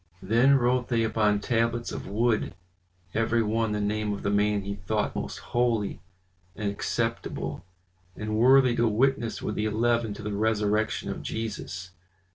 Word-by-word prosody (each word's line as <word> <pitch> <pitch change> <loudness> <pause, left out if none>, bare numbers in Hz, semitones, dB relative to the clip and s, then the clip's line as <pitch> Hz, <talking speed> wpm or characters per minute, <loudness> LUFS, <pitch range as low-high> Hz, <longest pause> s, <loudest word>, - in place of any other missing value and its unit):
Then 120 +7 +4
wrote 125 -1 +2
they 115 -2 +1
upon 110 -2 +2
tablets 115 +1 0
of - - -6
wood, 110 -2 0 0.6
every 115 +1 +2
one 110 +1 0
the 105 - -1
name 105 +1 -1
of 100 - -6
the 100 - 0
man 105 0 +2
he 100 +1 -3
thought 100 +2 -2
most - - -4 0.2
holy 120 -4 +1 0.6
and 105 -1 -2
acceptable, 100 - -3 0.5
and 110 0 -3
worthy 130 +2 +5
to 120 - +3
witness 120 +2 +1
with 105 - -2
the 105 - -1
eleven 115 0 +1
to 110 - -9
the 105 0 -3
resurrection 105 0 0
of - - -5
Jesus. 100 -5 -5
110 Hz, 155 wpm, -27 LUFS, 105-120 Hz, 0.6 s, worthy